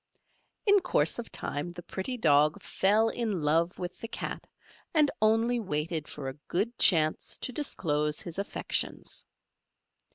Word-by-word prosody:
In 405 Hz, -1 st, +6 dB
course 240 Hz, -, +1 dB
of 235 Hz, -, -6 dB
time 150 Hz, +5 st, -4 dB
the 175 Hz, 0 st, -9 dB
pretty 220 Hz, +10 st, -4 dB
Dog 150 Hz, -6 st, +3 dB
fell 215 Hz, +4 st, +2 dB
in 215 Hz, -9 st, -2 dB
love 165 Hz, +4 st, +2 dB
with 180 Hz, 0 st, -6 dB
the 230 Hz, -, -6 dB
Cat, -, -, -6 dB, 0.5 s
and 300 Hz, -2 st, +4 dB
only 225 Hz, +3 st, +3 dB
waited 155 Hz, -4 st, -2 dB
for 145 Hz, -2 st, -7 dB
a 135 Hz, +2 st, -7 dB
good 215 Hz, +7 st, -1 dB
chance 155 Hz, -3 st, +4 dB
to -, -, -3 dB
disclose 150 Hz, -, 0 dB
his 175 Hz, +1 st, -6 dB
affections. 200 Hz, -, -2 dB
180 Hz, 140 wpm, -29 LUFS, 150-230 Hz, 0.5 s, In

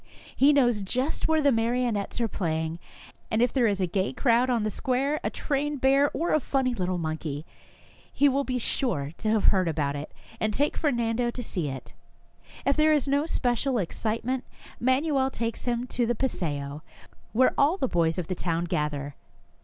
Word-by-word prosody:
He 280 Hz, +2 st, +5 dB
knows 245 Hz, -7 st, +3 dB
just 255 Hz, +9 st, -1 dB
where 315 Hz, -1 st, +2 dB
the 285 Hz, -, +5 dB
marionettes 230 Hz, -2 st, 0 dB
are 235 Hz, -, +1 dB
playing, 160 Hz, -4 st, -2 dB, 0.5 s
and 220 Hz, -, 0 dB
if 245 Hz, 0 st, +2 dB
there 250 Hz, -4 st, +3 dB
is 200 Hz, -2 st, 0 dB
a 185 Hz, -, +2 dB
gay 190 Hz, +2 st, -1 dB
crowd 245 Hz, -1 st, +3 dB
on 235 Hz, -3 st, +1 dB
the 215 Hz, -, -1 dB
square, 270 Hz, +7 st, 0 dB
a -, -, 0 dB
trained 290 Hz, 0 st, -2 dB
bear 275 Hz, +2 st, +4 dB
or 335 Hz, +4 st, -1 dB
a 310 Hz, -, +4 dB
funny 265 Hz, -3 st, 0 dB
little 185 Hz, -4 st, -1 dB
monkey, 155 Hz, -2 st, -4 dB, 0.7 s
he 285 Hz, -, +3 dB
will 280 Hz, +1 st, +2 dB
be 255 Hz, -2 st, -2 dB
sure 185 Hz, -, -1 dB
to 215 Hz, -, -1 dB
have 215 Hz, -1 st, +2 dB
heard 185 Hz, -2 st, +2 dB
about 145 Hz, -3 st, -1 dB
it, 145 Hz, +1 st, -6 dB, 0.3 s
and 215 Hz, -1 st, 0 dB
take 290 Hz, +2 st, +1 dB
Fernando 240 Hz, -5 st, 0 dB
to 245 Hz, +1 st, -5 dB
see 175 Hz, -8 st, -3 dB
it. 135 Hz, -1 st, -7 dB, 0.7 s
If 280 Hz, -, +3 dB
there 310 Hz, 0 st, +4 dB
is 290 Hz, -2 st, +1 dB
no 285 Hz, +3 st, +1 dB
special 250 Hz, -2 st, 0 dB
excitement, 230 Hz, +6 st, -2 dB, 0.4 s
Manuel 265 Hz, +2 st, +2 dB
takes 230 Hz, -3 st, -4 dB
him 240 Hz, 0 st, -1 dB
to 240 Hz, -2 st, 0 dB
the 240 Hz, -, +1 dB
paseo, 150 Hz, -, -2 dB, 0.5 s
where 255 Hz, +3 st, +4 dB
all 295 Hz, +7 st, +3 dB
the 265 Hz, -, 0 dB
boys 165 Hz, -4 st, +1 dB
of 180 Hz, -, -2 dB
the 185 Hz, -, -3 dB
town 170 Hz, -1 st, -1 dB
gather. 150 Hz, -3 st, -2 dB
235 Hz, 185 wpm, -27 LUFS, 180-270 Hz, 0.7 s, He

